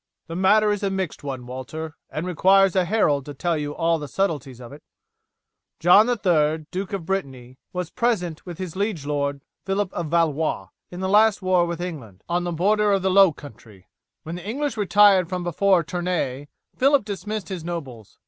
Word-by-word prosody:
"The 165 - -7
matter 210 +3 +4
is 205 - -2
a 200 - 0
mixed 190 -6 -4
one, 130 -3 -5
Walter, 145 +5 -7
and 155 +5 -4
it - - -5
requires 190 +2 +4
a 185 -1 +3
herald 160 -9 +1
to 145 - -7
tell 170 +5 -1
you 145 -1 -4
all 165 -1 +1
the 145 - -6
subtleties 145 -9 -2
of 125 +2 -10
it. 145 - -12 1.0
John 200 +7 +6
III, 160 -9 +1
Duke 190 +1 -4
of 190 -4 -4
Brittany, 135 -9 -4
was 180 -2 -4
present 180 -9 -1
with 175 -3 -8
his 185 -3 -6
liege 200 -7 -2
lord, 140 -1 -2 0.2
Phillip 195 0 -2
of 170 -2 -3
Valois, 155 - 0 0.2
in 180 +1 -8
the 190 - -1
last 210 +1 +4
war 180 -2 +3
with 170 -1 -4
England, 140 - -7
on 175 +1 -1
the 175 - -2
border 205 +5 +2
of 195 -2 +1
the 190 - +2
low 195 -1 +6
country. 110 - -14 0.3
When 160 - -6
the 175 0 -7
English 280 +1 -2
retired 205 -3 +4
from 180 -1 -3
before 175 +1 +2
Tournay 165 -6 -3 0.3
Phillip 275 -3 +3
dismissed 210 0 -5
his 185 -4 -5
nobles. 135 - -7
175 Hz, 190 wpm, -23 LUFS, 150-195 Hz, 1.0 s, John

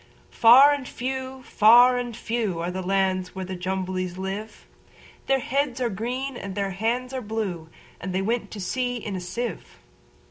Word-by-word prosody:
Far 260 +5 +7
and 280 -3 -4
few, 260 +1 -5
far 240 +4 +6
and 240 -2 -5
few, 225 -7 -2
Are 170 +2 -2
the 190 +1 -4
lands 185 -1 0
where 190 0 -4
the 185 +1 -5
Jumblies 185 0 -3
live:Their 210 +6 -5
heads 265 0 -1
are 245 -2 0
green, 250 +6 -3
and 195 -5 -6
their 200 -1 -1
hands 235 +6 -2
are 260 - -3
blue; 205 -7 -4 0.3
And 185 - -5
they 190 +1 -1
went 230 +3 -1
to 210 - -8
sea 245 +6 -2
in 215 -4 -5
a 185 - -4
sieve. 185 +3 -5
220 Hz, 170 wpm, -25 LUFS, 185-250 Hz, 0.3 s, Far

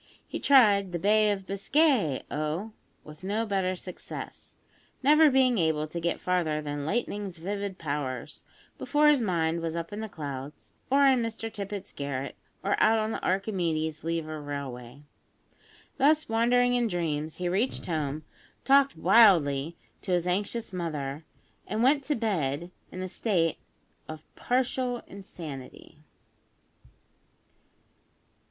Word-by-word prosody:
He - - -5
tried 205 -9 +5
"The - - 0
Bay 210 +3 +3
of 195 -2 -3
Biscay, 200 - +2
O!" 155 +8 -2 0.3
with 150 +3 -13
no 210 +4 -1
better 190 -3 0
success, 180 0 -8 0.5
never 305 +3 +6
being 255 -4 +3
able 160 -2 +1
to 170 +2 -5
get 170 0 -1
farther 170 -4 0
than 145 -1 -4
"lightning's 205 -3 -2
vivid 200 +2 -4
powers," 145 -3 -4 0.4
before 300 0 +3
his 290 -4 +4
mind 170 -5 0
was 165 0 -3
up 170 +3 -5
in 205 - -5
the 220 0 -5
clouds, 145 -4 -7 0.2
or 280 +2 +5
in 260 -3 +5
Mr 225 -1 -4
Tippet's 200 -1 -5
garret, 140 -1 -4 0.3
or 200 - 0
out 220 +1 +5
on 220 0 -1
the - - -5
Archimedes 170 -6 -1
Lever 160 -2 -3
Railway. 140 -2 -7 0.9
Thus 300 +3 +3
wandering 245 +2 +3
in 245 -1 +2
dreams 160 -5 -2
he 180 - -3
reached 200 +9 -1
home, 155 -2 -2 0.4
talked 275 0 +4
wildly 165 -9 +4 0.2
to 185 - -2
his 175 -1 +1
anxious 205 +4 -1
mother, 155 -4 -4 0.4
and 220 +2 -1
went 275 +2 +4
to 295 - 0
bed 175 - -1 0.2
in 185 - -5
a - - -3
state 175 -5 0 0.5
of 155 0 -8
partial 250 -1 -1
insanity. 165 -9 -10
185 Hz, 135 wpm, -28 LUFS, 155-225 Hz, 0.9 s, never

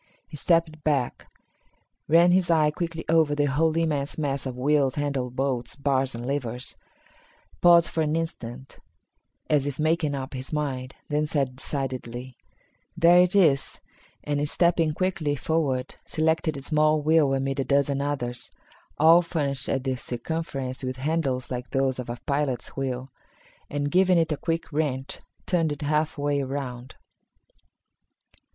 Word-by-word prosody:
He 155 - -10
stepped 160 0 +1
back, 140 -5 -1 0.8
ran 170 +3 +6
his 180 -1 +3
eye 155 -2 +4
quickly 165 0 -4
over 160 -2 +3
the 145 0 +2
whole 155 +3 +1
immense 150 -4 -1
mass 140 -3 -2
of 125 -1 -6
wheels, 140 0 +2
handles, 140 -4 -2
bolts, 130 -2 -1
bars 135 -2 0
and 120 +1 -6
levers, 125 -3 -3 0.9
paused 170 -1 +7
for 160 - -1
an 155 0 0
instant, 135 -6 -5 0.7
as 145 -2 +2
if 140 - -4
making 155 -1 +1
up 135 0 -5
his 130 0 -6
mind, 135 -4 -3
then 150 0 0
said 140 -5 -1
decidedly, 130 -3 -4 0.6
"There 170 +1 +6
it 180 +2 +3
is," 155 -9 +3 0.4
and, 145 0 -1
stepping 165 -3 +2
quickly 175 -6 0
forward, 140 -4 -1
selected 160 -1 0
a 135 - -8
small 155 +1 +2
wheel 155 -3 +4
amid 135 +1 -2
a - - +2
dozen 140 0 +1
others, 125 -4 -3 0.5
all 165 +3 +7
furnished 145 -6 -2
at 135 - 0
the 130 -1 -1
circumference 130 +1 -4
with 130 0 -3
handles 135 -3 -1
like 125 -1 -4
those 135 -1 0
of 125 - -5
a 120 - -4
pilot's 140 -4 -1
wheel, 130 -1 -3 0.6
and, 145 0 -2
giving 185 +1 +4
it 165 -1 +2
a 150 - 0
quick 165 0 -3
wrench, 140 -3 -2 0.3
turned 165 -4 +1
it 145 0 -4
half 150 +2 0
way 145 0 0
around. 130 -2 -5
145 Hz, 150 wpm, -26 LUFS, 130-160 Hz, 0.9 s, paused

